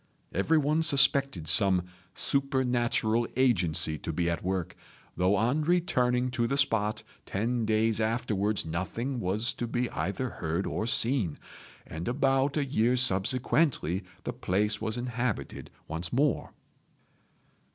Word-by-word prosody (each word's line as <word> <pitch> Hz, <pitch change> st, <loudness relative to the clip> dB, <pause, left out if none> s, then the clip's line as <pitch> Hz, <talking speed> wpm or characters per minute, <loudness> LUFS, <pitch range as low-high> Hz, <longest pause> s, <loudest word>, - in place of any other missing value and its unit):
Everyone 150 Hz, -, +2 dB
suspected 140 Hz, -, +3 dB
some 95 Hz, -1 st, +4 dB, 0.3 s
supernatural 125 Hz, -4 st, 0 dB
agency 85 Hz, -, +2 dB
to 80 Hz, -, -4 dB
be 85 Hz, +2 st, -1 dB
at 85 Hz, -, -3 dB
work, 90 Hz, -1 st, -3 dB, 0.4 s
though 90 Hz, +3 st, +2 dB
on 120 Hz, +9 st, +1 dB
returning 125 Hz, -7 st, +1 dB
to 120 Hz, -1 st, 0 dB
the 140 Hz, -, -1 dB
spot 110 Hz, -6 st, +1 dB, 0.2 s
ten 115 Hz, +3 st, -1 dB
days 110 Hz, 0 st, +1 dB
afterwards 110 Hz, -3 st, -1 dB
nothing 115 Hz, +11 st, -3 dB
was 105 Hz, +5 st, -1 dB
to 120 Hz, -, -4 dB
be 120 Hz, +1 st, -2 dB
either 100 Hz, +7 st, -3 dB
heard 85 Hz, -4 st, -3 dB
or 110 Hz, -, -3 dB
seen; 115 Hz, -, +2 dB, 0.5 s
and 80 Hz, +2 st, -7 dB
about 135 Hz, +2 st, +1 dB
a 145 Hz, -, +1 dB
year 125 Hz, -2 st, +1 dB
subsequently 120 Hz, -, +1 dB, 0.2 s
the 120 Hz, -, -4 dB
place 105 Hz, -2 st, -1 dB
was 110 Hz, +1 st, -2 dB
inhabited 120 Hz, -2 st, -3 dB, 0.2 s
once 80 Hz, +2 st, -4 dB
more." 140 Hz, +2 st, 0 dB
115 Hz, 125 wpm, -28 LUFS, 95-130 Hz, 0.5 s, some